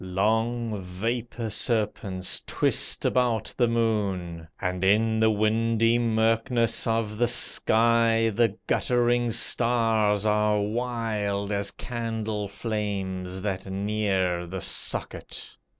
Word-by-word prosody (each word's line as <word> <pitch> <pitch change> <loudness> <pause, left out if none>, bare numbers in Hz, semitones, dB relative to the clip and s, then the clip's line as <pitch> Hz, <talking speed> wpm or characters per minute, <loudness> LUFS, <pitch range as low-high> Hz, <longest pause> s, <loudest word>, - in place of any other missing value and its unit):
Long 110 +3 -1
vapor 115 +5 -4
serpents 100 -6 -1
twist - - +3
about 120 -4 +1
the 120 - +2
moon, 100 -8 -1
And 90 -1 -2
in 110 +3 +3
the 110 0 +4
windy 115 +2 +2
murkness 115 +1 +1
of 110 -2 -1
the 120 - +3
sky, 115 -1 +3
The 115 -1 +1
guttering 120 -1 +1
stars 115 -3 +1
are 105 0 +2
wild 105 -2 -2
as 100 -1 0
candle 110 -3 -4
flames 95 -3 -4
That 95 -2 -3
near 95 -3 -1
the 95 +2 -5
socket. - - -3
110 Hz, 105 wpm, -26 LUFS, 100-115 Hz, -, the